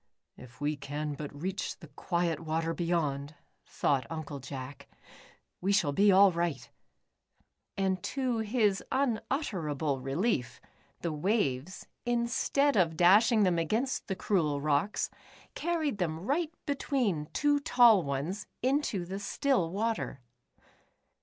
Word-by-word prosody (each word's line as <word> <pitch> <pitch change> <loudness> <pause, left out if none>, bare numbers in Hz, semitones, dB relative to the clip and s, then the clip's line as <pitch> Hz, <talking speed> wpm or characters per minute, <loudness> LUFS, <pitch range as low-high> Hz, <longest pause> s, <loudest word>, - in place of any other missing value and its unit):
" - - -57
If 120 -1 -18
we 145 +1 0
can 145 +2 -4
but 145 0 -6
reach 185 +7 -4
the - - -13
quiet 170 -3 -1
water 165 0 -1
beyond," 155 -4 -1 0.3
thought 130 -4 0
Uncle 155 -3 -5
Jack, 135 +1 -8 0.7
"we 190 +3 +1
shall 195 -8 +3
be 200 +7 +4
all 195 +1 +7
right," 170 -5 -2 1.1
and 190 -2 0
to 255 -1 -1
his 215 -3 +1
unutterable 190 - -1
relief, 135 - -1 0.4
the 170 -2 -2
waves, 155 - -1 0.2
in 240 -1 0
stead 280 +4 +1
of 165 -5 +2
dashing 210 +6 +5
them 180 -3 +2
against 225 - -1
the 190 - -2
cruel 160 -8 0
rocks, 150 +7 0 0.4
carried 315 -9 -1
them 160 -2 -2
right 310 +5 0
between 250 - -1
two 290 - +2
tall 240 -7 +6
ones, 145 +8 -3 0.2
into 255 -9 +1
the 190 +3 -5
still 200 -3 0
water. 215 -6 -2
180 Hz, 125 wpm, -30 LUFS, 150-225 Hz, 1.1 s, all